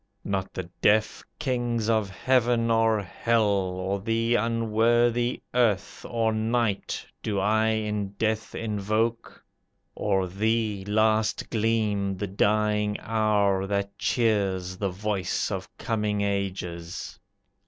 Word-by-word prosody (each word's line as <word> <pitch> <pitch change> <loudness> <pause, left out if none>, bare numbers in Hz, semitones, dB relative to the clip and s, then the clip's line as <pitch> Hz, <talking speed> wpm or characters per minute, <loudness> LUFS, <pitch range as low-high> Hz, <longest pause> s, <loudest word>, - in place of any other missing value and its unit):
Not 95 -1 -2
the 95 - -3 0.2
deaf 110 +1 +2
kings 120 -5 -1
of 110 -3 +1
heaven 120 +1 +2
or 115 -2 +3
hell, 115 +5 +1
Or 95 0 -1
the 115 +3 0
unworthy 115 +1 +2
earth, 115 -6 +1
Or 115 -2 +1
night, 110 -1 -1 0.2
do 105 -2 -2
I 110 +3 +2
in 105 -2 -1
death 110 +1 -2
invoke, 110 +2 -2 0.5
Or 95 -1 0
thee, 105 +2 0
last 110 +1 +1
gleam 105 -3 0
the 100 - -2
dying 105 +1 +1
hour 105 -3 +1
that 100 0 -2
cheers, 100 -6 +1
The 100 +1 -1
voice 100 0 -2
of - - -4
coming 105 -2 -1
ages. 95 -4 -3
105 Hz, 110 wpm, -26 LUFS, 100-115 Hz, 0.5 s, or